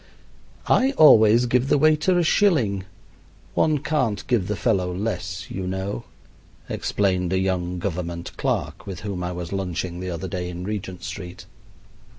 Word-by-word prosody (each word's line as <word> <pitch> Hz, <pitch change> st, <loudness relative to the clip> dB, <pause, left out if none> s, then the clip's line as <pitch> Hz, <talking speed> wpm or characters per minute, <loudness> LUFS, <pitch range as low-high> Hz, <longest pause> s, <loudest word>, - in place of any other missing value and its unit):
"I 265 Hz, +2 st, +3 dB
always 115 Hz, -, +7 dB
give 125 Hz, +2 st, +1 dB
the -, -, +4 dB
waiter 155 Hz, +5 st, +3 dB
a 175 Hz, -, +3 dB
shilling. 125 Hz, -, +2 dB, 0.7 s
One 155 Hz, -1 st, +2 dB
can't 140 Hz, -8 st, -1 dB
give 115 Hz, -7 st, +1 dB
the 105 Hz, -, -1 dB
fellow 95 Hz, -5 st, +1 dB
less, 90 Hz, -2 st, -4 dB
you 95 Hz, -1 st, -4 dB
know," 95 Hz, +4 st, -3 dB, 0.6 s
explained 90 Hz, -3 st, 0 dB
a -, -, +2 dB
young 90 Hz, -1 st, -1 dB
government 85 Hz, -2 st, -4 dB
clerk -, -, -2 dB
with 95 Hz, -3 st, -6 dB
whom 100 Hz, -4 st, -4 dB
I 90 Hz, -, -2 dB
was 90 Hz, 0 st, -5 dB
lunching 90 Hz, -2 st, -3 dB
the 90 Hz, 0 st, -4 dB
other 85 Hz, +1 st, -4 dB
day 90 Hz, -2 st, -4 dB
in 90 Hz, 0 st, -6 dB
Regent 95 Hz, -3 st, -5 dB
Street. 90 Hz, -2 st, -7 dB
95 Hz, 155 wpm, -23 LUFS, 90-115 Hz, 0.7 s, always